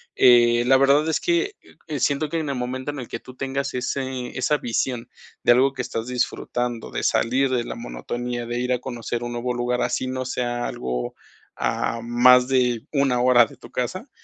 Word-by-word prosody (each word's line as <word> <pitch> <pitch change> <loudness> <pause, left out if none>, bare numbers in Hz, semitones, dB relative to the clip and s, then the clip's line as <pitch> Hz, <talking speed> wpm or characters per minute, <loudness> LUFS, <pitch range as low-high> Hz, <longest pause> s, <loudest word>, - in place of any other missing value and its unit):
eh, 120 -1 +6
la 135 +1 +6
verdad 140 +3 +4
es 160 - +1
que, 355 +4 +1 0.3
eh, 150 -3 -3
siento 145 +3 +1
que 165 - -1
en 155 -2 -3
el 140 - -1
momento 130 +3 -3
en 145 - -7
el 125 - -6
que - - -5
tú 130 - -13
tengas 135 +1 -2
ese 130 0 -3
esa 150 +3 +2
visión, 120 -1 -2 0.3
de - - +5
algo 130 +2 +3
que 130 - -3
estás 115 -2 -4
disfrutando 125 -1 -2
de - - -3
salir 130 +4 +2
de 125 -2 +1
la - - -6
monotonía, 120 - -5
de 120 +1 -3
ir 125 +1 0
a 125 - 0
conocer 120 -1 -4
un 120 - -4
nuevo 120 +1 -2
lugar 120 0 -1
así 130 - -1
no 130 0 -3
sea 120 -1 -2
algo, 60 -1 -3 0.4
ah, 115 - -1
más 125 +2 +5
de 125 -2 +1
1, 140 -4 +2
hora 125 -1 +6
de - - -15
tu - - -13
casa, 185 - -3
125 Hz, 200 wpm, -23 LUFS, 120-135 Hz, 0.4 s, eh